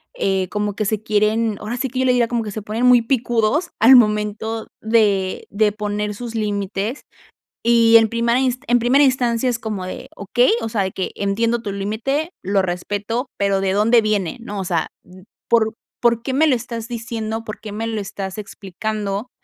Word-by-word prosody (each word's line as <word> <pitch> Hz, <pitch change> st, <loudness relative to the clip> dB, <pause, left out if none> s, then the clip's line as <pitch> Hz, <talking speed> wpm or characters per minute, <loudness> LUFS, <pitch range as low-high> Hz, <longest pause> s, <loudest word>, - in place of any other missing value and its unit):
eh, 190 Hz, -2 st, 0 dB
como 210 Hz, -1 st, -2 dB
que 215 Hz, -, -1 dB
se 215 Hz, +1 st, -1 dB
quieren 215 Hz, +1 st, +1 dB
ahora 230 Hz, +4 st, -4 dB
sí 265 Hz, +2 st, -1 dB
que, 255 Hz, +1 st, -4 dB
yo 260 Hz, -, +2 dB
le 250 Hz, -, +4 dB
diría 240 Hz, -2 st, +2 dB
como 235 Hz, -1 st, -1 dB
que 210 Hz, -, -5 dB
se 215 Hz, -, -5 dB
ponen 220 Hz, +4 st, -2 dB
muy 250 Hz, -1 st, +7 dB
picudos 240 Hz, +5 st, 0 dB
al 250 Hz, +5 st, +8 dB
momento 215 Hz, 0 st, +1 dB
de 210 Hz, -4 st, +1 dB
de 210 Hz, +1 st, +2 dB
poner 210 Hz, 0 st, -3 dB
sus 235 Hz, +2 st, -7 dB
límites, 205 Hz, +2 st, -2 dB, 0.6 s
y 230 Hz, -1 st, +5 dB
en 225 Hz, -1 st, +5 dB
primera 235 Hz, +1 st, +1 dB
ins 255 Hz, -1 st, +1 dB
en 245 Hz, +1 st, +4 dB
primera 260 Hz, +5 st, +4 dB
instancia 255 Hz, -2 st, +2 dB
es 235 Hz, -2 st, 0 dB
como 210 Hz, -5 st, -4 dB
de: -, -, -8 dB
"Okey, 240 Hz, +5 st, +2 dB
o 225 Hz, -, -3 dB
sea, 215 Hz, -2 st, 0 dB
de 190 Hz, -, -2 dB
que 190 Hz, -, -4 dB
entiendo 230 Hz, +4 st, 0 dB
tu 205 Hz, -, -4 dB
límite, 230 Hz, -, -2 dB
lo 195 Hz, +1 st, +1 dB
respeto, 205 Hz, +7 st, -3 dB
pero, 200 Hz, -1 st, +1 dB
¿de 190 Hz, -, +1 dB
dónde 225 Hz, +3 st, +4 dB
viene?, 210 Hz, -2 st, -1 dB
¿no?, 205 Hz, -3 st, -5 dB
o 190 Hz, -, -3 dB
sea, 170 Hz, -3 st, -1 dB, 0.2 s
mm, 185 Hz, +1 st, -16 dB, 0.3 s
¿por 220 Hz, -2 st, +3 dB, 0.3 s
por 235 Hz, -1 st, +3 dB
qué 260 Hz, +2 st, -3 dB
me 315 Hz, +3 st, +4 dB
lo 265 Hz, -, +4 dB
estás 235 Hz, -1 st, -5 dB
diciendo?, 225 Hz, -1 st, -4 dB
¿por 215 Hz, -1 st, -7 dB
qué 210 Hz, -1 st, -8 dB
me 225 Hz, +2 st, -3 dB
lo 225 Hz, -1 st, -2 dB
estás 195 Hz, -1 st, -6 dB
explicando?", 205 Hz, +2 st, -4 dB
220 Hz, 200 wpm, -20 LUFS, 205-235 Hz, 0.6 s, al